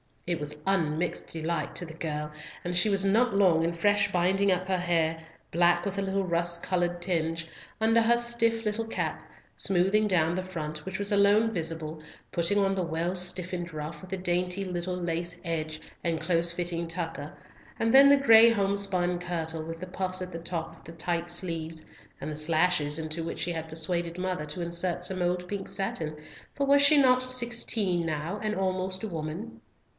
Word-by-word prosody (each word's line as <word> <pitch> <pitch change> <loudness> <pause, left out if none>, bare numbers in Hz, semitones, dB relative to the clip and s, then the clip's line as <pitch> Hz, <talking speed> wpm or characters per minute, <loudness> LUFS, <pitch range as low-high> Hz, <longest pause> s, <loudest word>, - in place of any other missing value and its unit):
It 175 -1 -1
was 150 0 -3
unmixed 170 -3 0
delight 165 +1 -3
to 175 - -2
the 160 - -9
girl, 150 -2 -4 0.3
and 175 0 -3
she 180 +5 +4
was 195 -1 +3
not 215 +3 +3
long 180 -5 +4
in 170 +1 0
fresh 205 +3 +2
binding 190 +3 +2
up 185 0 0
her 190 -1 +1
hair—black 170 0 0
with 200 0 -2
a - - +1
little 195 0 0
rust 170 -1 0
coloured 175 -1 -1
tinge—under 175 +6 -1
her 235 +1 +4
stiff 235 -1 +1
little 220 +1 -1
cap, - - -3 0.4
smoothing 195 +3 +2
down 170 -4 +2
the 185 +1 -2
front, 155 -4 -6
which 190 0 -4
was 205 0 +1
alone 205 +2 +4
visible, 160 -4 -4 0.3
putting 170 +4 +1
on 195 -1 +2
the 190 - -1
well 170 +2 -1
stiffened 180 -1 -1
ruff 150 +1 -6
with 185 - -11
the 190 - -3
dainty 180 +1 -1
little 180 -1 -3
lace 175 0 -3
edge 155 -2 -3 0.2
and 165 -2 -1
close 170 -1 +1
fitting 170 -1 -2
tucker, 165 -2 -4 0.4
and 225 0 +1
then 275 +1 +9
the 285 0 +7
gray 230 -4 +8
home 200 -3 +1
spun 180 -3 +1
kirtle, 165 -2 -3
with 165 0 -6
the - - -4
puffs 185 0 -1
at 185 0 -5
the 165 - -6
top 165 -1 -4
of - - -20
the 165 - -9
tight 170 +1 -2
sleeves, 165 -2 -3 0.4
and - - -4
the 150 - -4
slashes 155 -1 +2
into 160 +1 -3
which 165 - -5
she 175 - -1
had 160 -1 -4
persuaded 170 +2 -2
mother 185 -4 -2
to 150 +4 -5
insert 170 +1 -2
some 185 -1 0
old 180 0 0
pink 195 0 -4
satin, 160 -5 -2 0.4
for 280 - 0
was 285 0 +6
not 255 -3 +5
she 255 - -6
sixteen 235 -7 0
now, 160 +5 -3
and 215 0 -1
almost 185 0 -2
a - - -1
woman? 165 +5 -6
175 Hz, 190 wpm, -28 LUFS, 165-195 Hz, 0.4 s, then